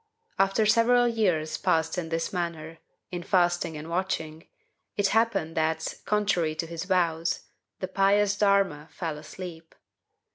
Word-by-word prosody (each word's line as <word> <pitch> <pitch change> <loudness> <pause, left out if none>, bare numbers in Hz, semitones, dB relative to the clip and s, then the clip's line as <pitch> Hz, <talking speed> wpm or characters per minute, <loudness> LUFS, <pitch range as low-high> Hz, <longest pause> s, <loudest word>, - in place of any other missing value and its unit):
After 195 +3 +3
several 235 +3 +4
years 180 -10 0
passed 160 0 +1
in 175 -3 -3
this 165 +2 -2
manner, 165 -2 -4 0.3
in 175 -1 -4
fasting 175 -3 +1
and 150 +1 -7
watching, 165 -2 -3 0.5
it 200 -1 +2
happened 225 -8 +1
that, 160 0 0
contrary 200 -7 +1
to 165 - -3
his 165 +1 -6
vows, 170 -3 +1 0.4
the 185 - -1
pious 200 +2 +3
Darma 195 -7 +2
fell 160 -2 -5
asleep! 165 +1 -9
175 Hz, 135 wpm, -27 LUFS, 160-200 Hz, 0.5 s, several